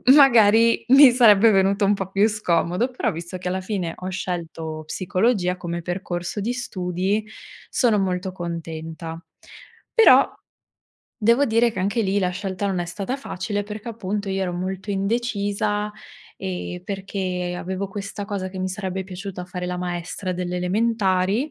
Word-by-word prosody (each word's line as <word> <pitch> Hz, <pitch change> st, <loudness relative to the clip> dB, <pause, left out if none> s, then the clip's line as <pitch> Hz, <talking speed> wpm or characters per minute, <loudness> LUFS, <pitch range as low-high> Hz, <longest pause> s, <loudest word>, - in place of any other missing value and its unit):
magari 230 Hz, -4 st, +6 dB
mi 270 Hz, 0 st, +9 dB
sarebbe 225 Hz, -3 st, +6 dB
venuto 195 Hz, +1 st, +3 dB
un 205 Hz, -, +4 dB
po' 195 Hz, -2 st, -3 dB
più 195 Hz, +2 st, +3 dB
scomodo, 180 Hz, +2 st, 0 dB
però 250 Hz, -, -1 dB
visto 170 Hz, +3 st, -6 dB
che 180 Hz, 0 st, -4 dB
alla 190 Hz, +1 st, -2 dB
fine 185 Hz, -4 st, -3 dB
ho 185 Hz, -, -5 dB
scelto 165 Hz, -4 st, -4 dB
psicologia 185 Hz, +1 st, 0 dB
come 170 Hz, -1 st, -4 dB
percorso 175 Hz, +1 st, -4 dB
di 225 Hz, +5 st, -1 dB
studi, 195 Hz, -2 st, -2 dB, 0.4 s
sono 225 Hz, -5 st, +2 dB
molto 185 Hz, 0 st, -1 dB
contenta. 165 Hz, -2 st, -6 dB, 0.7 s
Però 455 Hz, -2 st, +6 dB, 0.9 s
devo 235 Hz, +6 st, +4 dB
dire 230 Hz, 0 st, +3 dB
che -, -, -6 dB
anche 205 Hz, +4 st, 0 dB
lì 195 Hz, 0 st, +1 dB
la 185 Hz, -2 st, +1 dB
scelta 190 Hz, +1 st, -3 dB
non 190 Hz, -2 st, -1 dB
è -, -, -1 dB
stata 200 Hz, +9 st, -4 dB
facile 205 Hz, -5 st, -3 dB
perché 210 Hz, +2 st, -7 dB
appunto 205 Hz, -2 st, -3 dB
io 195 Hz, 0 st, -1 dB
ero 180 Hz, -2 st, -2 dB
molto 190 Hz, +3 st, -4 dB
indecisa 205 Hz, 0 st, -1 dB, 0.5 s
e 180 Hz, -1 st, -5 dB
perché 190 Hz, -2 st, -3 dB
avevo 190 Hz, +2 st, -4 dB
questa 200 Hz, +1 st, -6 dB
cosa 200 Hz, -3 st, -3 dB
che 185 Hz, -, -8 dB
mi 185 Hz, -, -1 dB
sarebbe 190 Hz, -1 st, -4 dB
piaciuto 185 Hz, -1 st, -7 dB
fare 180 Hz, 0 st, -5 dB
la 180 Hz, 0 st, -3 dB
maestra 180 Hz, +1 st, -3 dB
delle 180 Hz, 0 st, -3 dB
elementari 200 Hz, +4 st, +1 dB
190 Hz, 155 wpm, -23 LUFS, 180-210 Hz, 0.9 s, mi